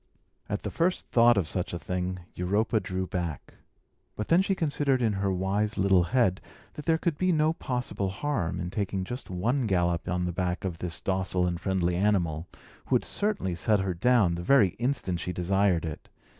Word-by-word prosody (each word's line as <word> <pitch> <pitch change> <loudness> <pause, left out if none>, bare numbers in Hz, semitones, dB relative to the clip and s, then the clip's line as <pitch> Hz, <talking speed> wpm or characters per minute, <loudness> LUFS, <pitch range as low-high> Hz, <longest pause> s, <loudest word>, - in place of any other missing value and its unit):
At - - -3
the - - -3
first 180 +2 0
thought 120 -1 +5
of 90 -6 +1
such 90 +2 -3
a - - -1
thing, 90 +1 -3
Europa 105 +5 +1
drew 95 -2 -3
back. 85 -4 -4 0.6
But 105 - -4
then 170 +3 +5
she 195 0 0
considered 145 -5 +1
in 115 -4 +1
her 100 0 0
wise 100 +4 -1
little 95 -1 +4
head 105 -4 +2 0.3
that 150 - -8
there 165 -1 +4
could 165 -2 -2
be 185 0 +3
no 155 -1 +3
possible 125 -9 -3
harm 100 - -2
in 90 0 -4
taking 100 -2 -2
just 125 +7 -6
one 115 +8 0
gallop 85 -3 0
on 90 0 0
the 90 - -1
back 90 +1 -2
of 85 -3 -4
this 90 -1 -5
docile 95 -1 0
and 85 -1 -2
friendly 90 -3 0
animal, 90 -5 +1 0.4
who - - +2
would - - +1
certainly 200 - -1
set 100 +5 +2
her 95 -1 -1
down 105 0 +3
the 85 - -3
very 125 0 +5
instant 120 -9 0
she 90 - -3
desired 90 -1 +1
it. 80 -2 -7
95 Hz, 195 wpm, -28 LUFS, 90-120 Hz, 0.6 s, thought